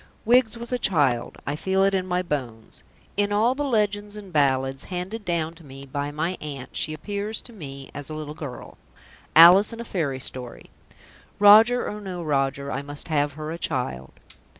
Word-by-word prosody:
Wiggs 240 -1 +4
was 235 +1 -7
a 250 - 0
child; 140 - +1
I 145 - -2
feel 190 +4 +1
it 195 0 +3
in 185 -1 0
my 180 0 0
bones. 125 -9 -5 0.4
In 205 0 +1
all 220 +4 +3
the 290 +2 -3
legends 210 -5 0
and 200 -4 -10
ballads 135 -2 +1
handed 190 +5 -5
down 165 -3 -1
to 165 0 -15
me 135 -1 -11
by 145 +1 -3
my 160 +5 -3
aunt 140 -4 -7
she 155 - 0
appears 205 +7 -4
to 240 - -10
me 140 -8 -9
as 145 +1 -6
a 155 - -5
little 150 -1 -6
girl 145 -5 -9 0.6
Alice 175 +6 +9
in 230 - -8
a 235 - -5
fairy 150 -11 -2
story. 125 -2 -5 0.7
Roger 220 +4 +7
or 210 0 -5
no 185 -3 -6
Roger 140 -2 -1
I 140 - -2
must 145 +3 -7
have 145 -2 +1
her 155 +1 -6
a 170 - -6
child. 65 - -3
165 Hz, 190 wpm, -24 LUFS, 140-205 Hz, 0.7 s, Alice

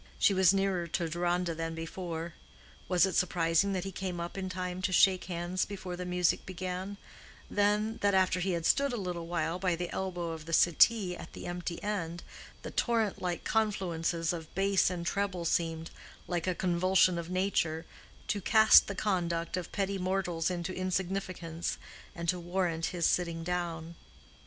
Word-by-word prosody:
She 200 - +4
was 190 -2 +5
nearer 195 -3 0
to 170 +1 -1
Deronda 175 +1 0
than 165 0 -4
before: 165 0 -5 0.6
was 180 0 +5
it 190 - -2
surprising 175 +1 +2
that 185 -2 -1
he 195 - -5
came 185 -1 -4
up 170 0 -5
in 190 -1 -3
time 180 0 -4
to 190 - 0
shake 185 0 +4
hands 175 +1 -2
before 190 -3 -5
the 180 0 -5
music 180 -1 +1
began—then, 200 +3 -3
that 200 -1 +3
after 185 -1 +3
he 185 +1 0
had 170 -1 -2
stood 280 +4 +3
a - - -1
little 175 -4 -4
while 170 0 -1
by 180 -2 +1
the 175 +1 -4
elbow 175 -3 -3
of 160 -1 -7
the 165 - -4
settee 180 +3 +4
at - - -10
the - - -8
empty 175 -1 -4
end, 175 -5 -3 0.4
the - - -6
torrent 225 -4 0
like 175 -2 -2
confluences 175 -6 0
of 160 -2 -7
bass 195 -1 +3
and 175 -2 -4
treble 190 -2 -1
seemed, 165 -1 -1 0.4
like 175 -1 -2
a 185 - +1
convulsion 185 0 +3
of 170 0 -6
nature, 180 -4 0 0.4
to 205 - -1
cast 220 +3 +7
the 200 - -4
conduct 170 -5 -1
of 180 -2 -5
petty 195 -1 -1
mortals 180 -3 0
into 180 0 -3
insignificance, 185 -2 -2 0.4
and 170 -1 -5
to 180 +1 +1
warrant 175 -2 -1
his 175 -2 -1
sitting 170 -2 +1
down? 170 -1 -3
180 Hz, 170 wpm, -31 LUFS, 170-190 Hz, 0.6 s, cast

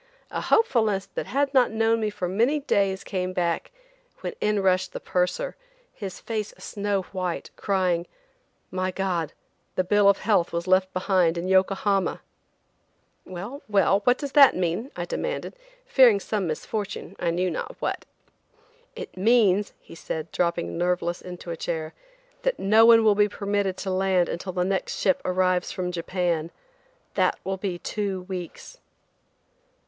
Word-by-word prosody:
A - - -2
hopefulness 220 - +2
that - - -4
had 280 +1 0
not 260 -2 +5
known 225 +1 +2
me 215 -1 0
for 195 -3 -4
many 230 +11 +2
days 195 -8 +1
came 185 -2 -3
back, 170 -2 -1 0.5
when - - -4
in 210 -1 +2
rushed 185 -1 +1
the - - -4
purser, 185 - -1 0.4
his 195 -4 -7
face 215 -2 -4
a - - -18
snow 200 -1 -2
white, 185 -3 -3
crying: 180 -4 0 0.6
"My 185 0 -1
God, 180 -4 -2 0.4
the 185 - +2
bill 205 +2 +4
of 200 - +4
health 200 -6 +1
was 170 0 -2
left 185 0 +3
behind 185 -2 +2
in 170 +2 -3
Yokohama." 190 +1 +2 1.1
"Well–well–what 205 +2 +1
does 285 -2 -5
that 280 -2 +7
mean?" 180 +8 -1
I - - -3
demanded, - - -4 0.3
fearing 240 -6 +6
some 200 -2 -2
misfortune, 195 +5 -4
I 170 - 0
knew 180 +2 0
not - - -5
what. - - -3 0.9
"It 475 -2 -8
means," 205 -1 +3
he - - -15
said, 160 -1 -5
dropping 170 -1 -1
nerveless 175 -1 0
into 180 -1 -8
a - - -3
chair, 160 -1 -4 0.5
"that - - 0
no 220 +3 +5
one 230 -1 +7
will 215 -1 +5
be 205 0 +3
permitted 200 -2 -1
to 190 - -3
land 185 -1 +2
until 185 +2 -4
the 180 -1 0
next 195 0 -1
ship 190 - +2
arrives 185 0 +1
from 180 -1 -3
Japan. 170 -2 -1 0.6
That - - +2
will 190 0 -2
be 185 -2 -3
two 195 0 -3
weeks." 180 -2 -8
190 Hz, 155 wpm, -25 LUFS, 180-210 Hz, 1.1 s, that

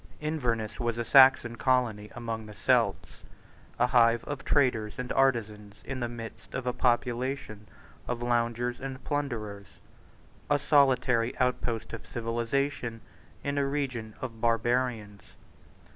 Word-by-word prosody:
Inverness 120 -8 -2
was 120 -1 -1
a 120 - -2
Saxon 130 -3 +6
colony 115 -6 +1
among 115 -2 -5
the 105 - -11
Celts, 105 - +1 0.6
a 120 - +4
hive 120 -2 +4
of 140 -1 -6
traders 120 -8 +1
and 125 -1 -4
artisans 105 -6 0
in 135 -1 -4
the 120 -1 -2
midst 115 -1 -9
of 125 - -3
a 125 - 0
population 120 -3 -1 0.4
of 120 -1 -3
loungers 120 0 0
and 135 -1 -6
plunderers, 110 - -3 0.8
a 145 - +4
solitary 130 -5 +3
outpost 125 -3 -1
of - - -8
civilisation 115 +1 -2 0.4
in 140 0 -1
a 140 - +1
region 130 -6 -3
of 115 -3 -6
barbarians. 115 -3 0
120 Hz, 130 wpm, -29 LUFS, 115-130 Hz, 0.8 s, Saxon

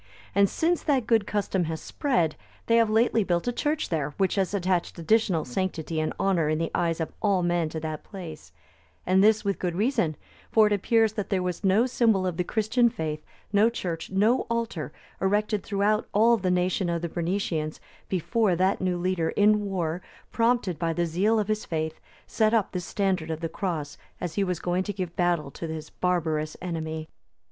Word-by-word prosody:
And 200 0 +4
since 340 +1 +1
that 270 -6 +1
good 225 -3 +2
custom 195 -3 0
has 160 0 -3
spread, 175 - 0 0.3
they 230 - +4
have 230 -2 +4
lately 225 0 +3
built 175 +2 0
a - - +2
church 300 +4 -1
there, 150 -4 -2
which 190 -2 +2
has 195 -2 0
attached 185 -3 0
additional 180 -2 +2
sanctity 165 +2 -2
and 155 - 0
honour 185 -6 +2
in 155 - +1
the 165 0 -2
eyes 165 -1 0
of 160 - -3
all 195 -4 +2
men 175 -2 +1
to 160 - -4
that 155 -1 -4
place;(292) 165 - -9 0.5
and 190 +1 +4
this 215 0 +4
with 200 -1 0
good 175 -2 -2
reason; 215 - +1 0.3
for 220 -1 +5
it 210 - +2
appears 220 +2 +2
that 210 -2 -4
there 190 -3 +1
was 180 +1 -3
no 200 +5 +4
symbol 225 -6 +2
of 180 -3 -2
the 180 - +1
Christian 225 +5 +2
faith, 155 -6 -4 0.3
no 210 +3 +5
church, 175 -8 -4
no 210 +6 +2
altar 230 - -2 0.3
erected 205 +2 +1
throughout 205 +1 +1
all 230 +3 +6
the 190 -4 -1
nation 180 0 +1
of 170 0 -2
the - - 0
Bernicians, 165 -2 -2 0.3
before 195 +2 +1
that 185 +3 +1
new 185 -1 0
leader 175 -2 0
in 210 0 +3
war, 175 -3 -2 0.3
prompted 230 -8 +1
by 165 0 0
the 175 +1 0
zeal 190 +7 +2
of 210 -2 0
his 215 0 -1
faith, 160 -1 -3 0.3
set 220 0 +2
up 215 -4 +1
this 180 -2 -4
standard 190 -5 -1
of 160 -1 -3
the 165 - -1
Cross 160 -5 -4 0.2
as 175 -3 -4
he 200 - +1
was 180 -3 -2
going 180 +1 0
to 205 +2 -3
give 180 -3 -5
battle 175 -5 +1
to 165 - -6
his 160 -1 -6
barbarous 160 -4 -1
enemy. 160 -3 -4
185 Hz, 195 wpm, -26 LUFS, 165-210 Hz, 0.5 s, all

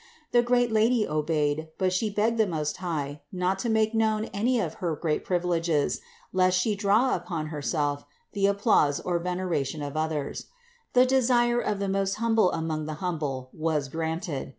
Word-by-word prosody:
The 240 - +5
great 245 0 +2
Lady 220 +1 +3
obeyed, 150 0 0
but 185 -1 +1
She 215 +4 0
begged 220 +3 0
the 220 - +4
Most 155 -4 -2
High 150 -5 -4
not 185 +1 -1
to 235 - -2
make 220 0 +2
known 220 -1 +1
any 235 +5 +1
of - - -2
her 170 -3 0
great 155 0 -1
privileges, 170 -4 0 0.3
lest 185 0 +3
She 210 +4 +1
draw 210 +6 +3
upon 170 -3 -3
Herself 145 -1 -1 0.3
the 200 -1 +2
applause 200 -8 +3
or 175 -1 -1
veneration 170 -5 -2
of 145 0 -5
others. 155 -2 -2 0.5
The 250 0 +6
desire 240 -2 +3
of 210 - -1
the 200 0 -2
most 195 0 0
Hum 230 0 0
ble 220 -5 +4
among 155 -1 -2
the 155 - -4
humble 150 -7 -3
was 155 -3 -1
granted. 160 0 -3
180 Hz, 175 wpm, -27 LUFS, 155-215 Hz, 0.5 s, The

